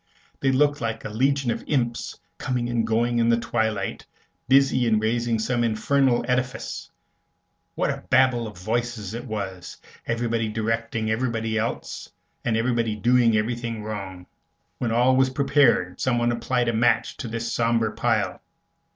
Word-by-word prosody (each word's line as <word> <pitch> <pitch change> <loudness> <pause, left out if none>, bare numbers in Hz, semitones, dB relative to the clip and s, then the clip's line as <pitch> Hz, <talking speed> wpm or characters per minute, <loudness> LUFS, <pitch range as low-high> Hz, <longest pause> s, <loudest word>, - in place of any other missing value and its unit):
They 135 - +2
looked 145 +2 +2
like 115 -1 -3
a - - -3
legion 135 +3 +1
of - - -4
imps, 120 -5 -1 0.2
coming 125 -2 -1
and 115 -2 0
going 120 +1 +1
in 115 0 +3
the 115 - +4
twilight, 110 -4 -2 0.4
busy 135 -2 +4
in 110 -1 +3
raising 115 +1 0
some 120 +2 0
infernal 120 +3 +2
edifice. 125 0 -2 0.9
What - - +1
a - - -6
Babel 130 -3 +3
of 105 -3 -10
voices 110 +1 -3
it 120 +2 -5
was, 100 -6 -5 0.3
everybody 115 -1 -1
directing 115 0 -1
everybody 115 -1 -1
else, 110 +1 -3 0.3
and 115 -2 +1
everybody 115 -2 0
doing 120 0 +3
everything 115 0 -2
wrong! 95 -4 -6 0.5
When 120 -3 -1
all 125 +3 +4
was 130 0 +4
prepared, 130 -9 +2
someone 120 -2 +2
applied 120 +1 0
a 115 - +1
match 115 +1 +2
to - - -5
the 115 +1 -3
sombre 115 -1 0
pile. 110 -1 0
115 Hz, 150 wpm, -24 LUFS, 110-125 Hz, 0.9 s, the